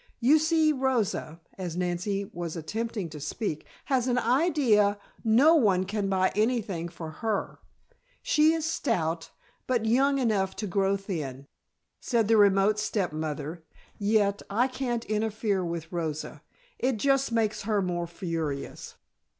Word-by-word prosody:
You 280 +6 +5
see, 315 0 +3
Rosa," 245 - -1 0.2
as 175 -2 -4
Nancy 180 +3 -1
was 170 -2 -4
attempting 215 +3 -3
to 155 -1 -9
speak, 155 - -4 0.2
"has 260 -3 +1
an 250 -1 +1
idea 245 - +3 0.3
no 245 +8 +5
one 200 - +4
can 200 +1 -2
buy 185 -1 +2
anything 210 -6 0
for 165 -2 -8
her. 220 -3 -2 0.6
She 305 +1 +4
is 325 -1 -1
stout, 175 - -1 0.4
but 240 -3 +1
young 270 +5 +3
enough 210 -7 0
to 215 - -4
grow 195 +1 +1
thin," 150 -9 -5 0.5
said 230 -4 +1
the 225 0 +4
remote 200 +1 +4
step 205 -5 -1
mother, 155 +1 -4 0.4
"yet, 205 -1 +2
I 230 +6 +2
can't 250 -3 -3
interfere 215 -2 -1
with 170 -1 -5
Rosa. 160 -3 -4 0.4
It 255 -2 +1
just 275 +2 +2
makes 225 -2 0
her 210 0 0
more 175 -2 -2
furious." 165 -5 -4
205 Hz, 140 wpm, -27 LUFS, 175-240 Hz, 0.6 s, You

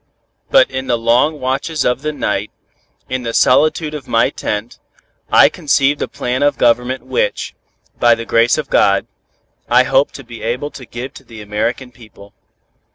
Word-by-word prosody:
"But - - +4
in 130 0 -4
the 120 - +1
long 125 +7 +2
watches 135 +4 -2
of 125 +1 0
the 155 +1 -2
night, 105 -7 -2 0.6
in 130 0 -3
the 115 -1 -4
solitude 155 +3 +3
of 150 -4 -7
my 115 - +2
tent, 105 +3 -4 0.5
I - - +7
conceived 140 0 +1
a - - -1
plan 125 +1 -3
of 145 -2 +2
government 125 +2 +1
which, - - -2 0.5
by 120 -1 +5
the 115 0 -7
grace 115 +4 +3
of 150 -3 -5
God, 100 -1 +3 0.6
I 125 +2 +5
hope 135 +2 +2
to 135 - -9
be 120 -1 -11
able 125 +6 -3
to 125 - -11
give 125 +3 -7
to - - -13
the 115 -2 -12
American 115 +5 -3
people. 105 -4 -16
125 Hz, 170 wpm, -17 LUFS, 115-140 Hz, 0.6 s, I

